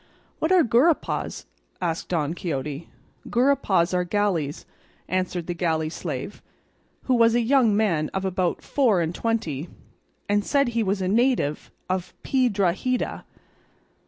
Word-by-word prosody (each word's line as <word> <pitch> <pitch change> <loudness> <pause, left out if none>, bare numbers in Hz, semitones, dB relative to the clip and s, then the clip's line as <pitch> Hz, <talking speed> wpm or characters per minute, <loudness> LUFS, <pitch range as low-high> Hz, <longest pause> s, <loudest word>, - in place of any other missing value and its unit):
"What 315 - 0
are 365 -3 +6
gurapas?" 270 +7 +1 0.3
asked 170 -2 -2
Don 160 -3 0
Quixote. 150 -3 -4 0.4
"Gurapas 240 -9 +2
are 180 0 +2
galleys," 180 -6 -1 0.4
answered 185 -2 -2
the 175 - -3
galley 160 -2 0
slave, - - -5 0.6
who 260 - +1
was 230 -1 +4
a - - +4
young 235 -3 +3
man 170 -9 +1
of 190 0 -3
about 185 -2 -1
four 240 -10 +2
and 165 +1 -1
twenty, 175 - -2 0.6
and 205 0 +2
said 280 +1 +2
he 230 -1 0
was 195 -2 0
a - - 0
native 225 - +1 0.2
of 185 -1 -3
Piedrahita. 245 -1 0
190 Hz, 130 wpm, -24 LUFS, 170-235 Hz, 0.6 s, are